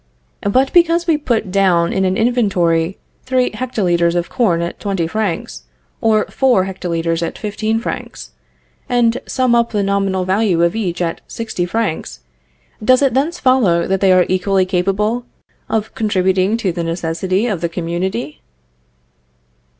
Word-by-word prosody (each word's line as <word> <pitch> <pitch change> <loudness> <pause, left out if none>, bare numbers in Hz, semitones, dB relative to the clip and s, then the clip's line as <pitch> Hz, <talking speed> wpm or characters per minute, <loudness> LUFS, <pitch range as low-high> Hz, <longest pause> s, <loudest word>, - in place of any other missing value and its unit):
But 260 +5 +2
because 340 0 +4
we 330 -2 +3
put 235 -9 -1
down 180 -3 +2
in 190 - +1
an 185 +1 0
inventory 190 -8 +1 0.2
three 255 -1 0
hectolitres 180 -8 0
of 175 -1 -1
corn 175 -9 +1
at 170 - -5
20 195 -5 -1
francs, 170 - -3 0.4
or 215 -1 +3
four 250 -8 +2
hectolitres 170 -3 -2
at 165 - -3
15 215 +1 -2
francs, 230 - -6 0.6
and 240 0 +2
sum 255 -2 +1
up 235 0 +3
the 205 -2 -1
nominal 195 -2 0
value 190 -3 +2
of 170 +3 +1
each 180 -5 -2
at 165 -1 -3
60 215 -6 -4
francs, 180 - -3 0.6
does 255 +4 +4
it 270 -4 +2
thence 300 +7 0
follow 230 - +3
that 190 0 -1
they 195 -1 +4
are 185 -1 +5
equally 185 +1 +1
capable 195 +6 0 0.5
of 220 -1 -2
contributing 190 -1 +1
to 200 -5 -1
the 170 0 -3
necessities 175 +6 -1
of 185 -5 -3
the 170 - -1
community? 175 +2 -3
195 Hz, 150 wpm, -17 LUFS, 175-230 Hz, 0.6 s, are